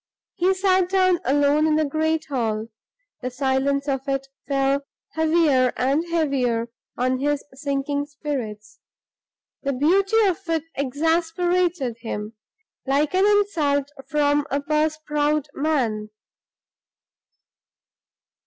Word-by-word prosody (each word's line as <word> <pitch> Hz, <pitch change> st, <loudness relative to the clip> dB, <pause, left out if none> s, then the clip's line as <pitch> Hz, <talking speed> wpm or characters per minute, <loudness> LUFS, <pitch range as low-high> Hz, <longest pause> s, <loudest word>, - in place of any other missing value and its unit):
He 370 Hz, +2 st, +2 dB
sat 375 Hz, -1 st, +2 dB
down 370 Hz, -2 st, +3 dB
alone 290 Hz, +2 st, +3 dB
in 310 Hz, -, +3 dB
the 310 Hz, 0 st, +2 dB
great 315 Hz, +2 st, 0 dB
hall; 225 Hz, -5 st, -2 dB, 0.5 s
the 255 Hz, -, -2 dB
silence 270 Hz, +2 st, 0 dB
of 270 Hz, 0 st, -2 dB
it 270 Hz, 0 st, -2 dB, 0.2 s
fell 275 Hz, 0 st, +1 dB, 0.3 s
heavier 310 Hz, -5 st, +3 dB
and 275 Hz, +5 st, +1 dB
heavier 260 Hz, -8 st, 0 dB, 0.3 s
on 255 Hz, +1 st, +1 dB
his 290 Hz, +1 st, 0 dB
sinking 285 Hz, +1 st, -2 dB
spirits; 260 Hz, -8 st, -6 dB, 0.8 s
the 275 Hz, -1 st, -1 dB
beauty 385 Hz, -, +2 dB
of 370 Hz, -4 st, +1 dB
it 325 Hz, -2 st, +1 dB
exasperated 325 Hz, 0 st, 0 dB
him, 215 Hz, -2 st, -5 dB, 0.5 s
like 285 Hz, +4 st, +1 dB
an 380 Hz, +2 st, +4 dB
insult 310 Hz, -9 st, +2 dB, 0.2 s
from 290 Hz, 0 st, +2 dB
a 280 Hz, -, 0 dB
purse 305 Hz, +1 st, 0 dB
proud 300 Hz, 0 st, 0 dB
man. 245 Hz, -9 st, -1 dB
290 Hz, 110 wpm, -23 LUFS, 270-320 Hz, 0.8 s, an